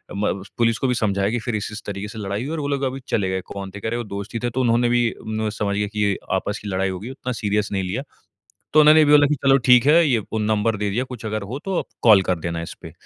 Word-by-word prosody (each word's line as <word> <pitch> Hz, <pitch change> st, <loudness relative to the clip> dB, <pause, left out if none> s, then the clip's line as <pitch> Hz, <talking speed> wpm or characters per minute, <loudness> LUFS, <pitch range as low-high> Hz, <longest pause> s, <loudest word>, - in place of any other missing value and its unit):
म 100 Hz, +1 st, 0 dB
उस 95 Hz, -, -14 dB
पुलिस 115 Hz, -1 st, +3 dB
को 135 Hz, -, 0 dB
भी 125 Hz, -, +2 dB
समझाया 100 Hz, -3 st, 0 dB
कि 120 Hz, -, -1 dB
फिर 115 Hz, 0 st, -3 dB
इस-इस 105 Hz, +1 st, -5 dB
तरीके 100 Hz, 0 st, -5 dB
से 110 Hz, -1 st, -8 dB
लड़ाई 100 Hz, +3 st, -3 dB
हुई 150 Hz, -, -4 dB
और 165 Hz, -, -3 dB
वो 145 Hz, -, -2 dB
लोग 140 Hz, -1 st, -1 dB
अभी 135 Hz, 0 st, -2 dB
चले 95 Hz, -4 st, 0 dB
गए 95 Hz, 0 st, -2 dB
कौन 100 Hz, -1 st, -6 dB
थे 105 Hz, -, -9 dB
कह -, -, -2 dB
रहे 120 Hz, -, -2 dB
वो 120 Hz, -, -3 dB
दोस्त 100 Hz, +1 st, -7 dB
ही -, -, 0 dB
थे 120 Hz, -, +1 dB
तो 130 Hz, +3 st, -2 dB
उन्होंने 120 Hz, 0 st, +2 dB
भी 120 Hz, 0 st, +3 dB, 0.2 s
नू 110 Hz, 0 st, -1 dB
समझ 105 Hz, -1 st, -2 dB
गए 105 Hz, 0 st, 0 dB
कि 105 Hz, -2 st, 0 dB, 0.2 s
आपस 100 Hz, +2 st, -1 dB
की -, -, -6 dB
लड़ाई 95 Hz, 0 st, 0 dB
हो 95 Hz, -1 st, -4 dB
गई 115 Hz, +5 st, -7 dB
उतना 130 Hz, -1 st, -5 dB
सीरियस 105 Hz, -2 st, -1 dB
नहीं 95 Hz, -1 st, -1 dB
लिया। 100 Hz, +8 st, -3 dB, 0.7 s
तो 155 Hz, -, +8 dB
उन्होंने 155 Hz, +1 st, +7 dB
भी 145 Hz, -, +2 dB
बोला 145 Hz, -1 st, +7 dB
कि 150 Hz, -, +2 dB
चलो 135 Hz, 0 st, +3 dB
ठीक 125 Hz, +1 st, +6 dB
है, 165 Hz, +3 st, +6 dB
ये 120 Hz, -4 st, +2 dB
फ़ोन 110 Hz, +1 st, -4 dB
नंबर 110 Hz, +1 st, +1 dB
दे 105 Hz, 0 st, -1 dB
दिया 120 Hz, +6 st, -1 dB
कुछ 125 Hz, -4 st, -8 dB
अगर 110 Hz, 0 st, -3 dB
हो 120 Hz, +8 st, -5 dB
तो 190 Hz, -2 st, -1 dB, 0.2 s
कॉल 105 Hz, -5 st, +7 dB
कर 90 Hz, -2 st, -1 dB
देना 85 Hz, 0 st, -3 dB
इसपे। 80 Hz, -1 st, -9 dB
110 Hz, 295 wpm, -22 LUFS, 100-125 Hz, 0.7 s, तो